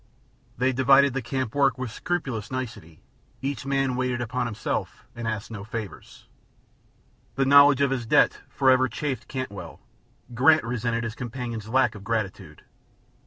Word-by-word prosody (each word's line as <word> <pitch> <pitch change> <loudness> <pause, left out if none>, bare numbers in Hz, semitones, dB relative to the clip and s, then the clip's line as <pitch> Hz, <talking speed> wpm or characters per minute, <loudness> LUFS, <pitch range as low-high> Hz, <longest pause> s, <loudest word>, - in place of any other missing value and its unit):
They 130 +1 +1
divided 135 +1 +5
the 135 - -2
camp 125 -1 -3
work 140 -1 +2
with 130 -3 -4
scrupulous 130 -8 -3
nicety, 110 -11 -7 0.4
each 135 0 -4
man 135 -2 +1
waited 125 -1 -1
upon 120 +1 -2
himself 105 -3 -4
and 115 -1 -5
asked 110 0 -4
no 100 -3 -6
favors. 110 -1 -8 1.1
The 135 - +1
knowledge 140 0 +7
of 140 -1 +2
his 120 -4 -2
debt - - +3
forever 130 -1 +3
chafed 130 -5 -4
Cantwell; 100 -11 -6 0.5
Grant 150 +7 +5
resented 115 0 -2
his 115 -1 -4
companion's 120 -3 -6
lack 130 +2 +3
of 100 - -11
gratitude. 110 -3 -4
125 Hz, 145 wpm, -25 LUFS, 115-135 Hz, 1.1 s, knowledge